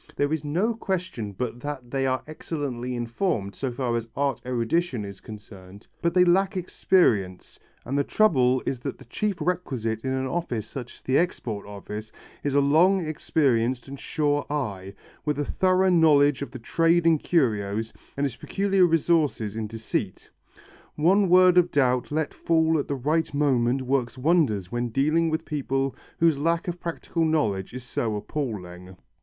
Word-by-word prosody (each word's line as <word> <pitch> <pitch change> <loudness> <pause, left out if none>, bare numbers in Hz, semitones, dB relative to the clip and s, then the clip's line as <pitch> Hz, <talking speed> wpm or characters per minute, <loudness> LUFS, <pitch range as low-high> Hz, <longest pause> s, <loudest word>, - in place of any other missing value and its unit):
There 145 +2 0
is 160 -2 -2
no 180 +11 0
question 180 - -3
but 120 +4 -4
that 130 -3 -6
they 135 -1 0
are 130 0 -1
excellently 140 -5 -4
informed, 120 - -2
so 135 +3 -3
far 120 -1 -2
as 115 -1 -2
art 140 -1 0
erudition 125 +1 -1
is 100 -1 -9
concerned, 100 -2 -12 0.2
but 170 +1 0
they 180 0 +6
lack 190 +2 +2
experience, 115 - +1 0.3
and 130 - -3
the 140 - +2
trouble 130 -11 +3
is 130 - -2
that - - -5
the - - -15
chief 205 - -2
requisite 130 -10 -2
in 130 - -1
an 130 0 -1
office 130 -7 -2
such 125 -3 -8
as - - -19
the 130 - +2
Export 115 - -2
Office 105 +1 -7 0.3
is 145 -1 -1
a - - +6
long 170 +6 +4
experienced 130 -6 0
and 140 0 -8
sure 145 -1 0
eye, 100 -10 -4 0.3
with 150 -1 -1
a 145 - -1
thorough 185 +2 +2
knowledge 145 -5 +4
of 140 - -4
the 130 - -8
trade 165 +7 +2
in 165 -2 +4
curios, 110 - 0 0.2
and 140 - +1
its 130 -4 -3
peculiar 195 +3 +2
resources 155 - +1
in 110 -1 -3
deceit. 110 -3 -4 0.6
One 185 +5 +3
word 180 0 +7
of 175 0 +2
doubt 125 -4 +1
let 155 0 -1
fall 160 -1 +2
at - - -3
the 140 - -2
right 155 +5 0
moment 130 -3 +2
works 130 -2 -1
wonders 125 - +1
when 120 0 -1
dealing 155 +7 +2
with 160 +1 -2
people 135 -2 -2 0.2
whose 165 -4 +3
lack 165 +3 0
of 175 0 -4
practical 170 0 -3
knowledge 110 -13 0
is 125 0 -7
so 115 -3 -2
appalling. 95 -7 -5
140 Hz, 170 wpm, -25 LUFS, 115-165 Hz, 0.6 s, word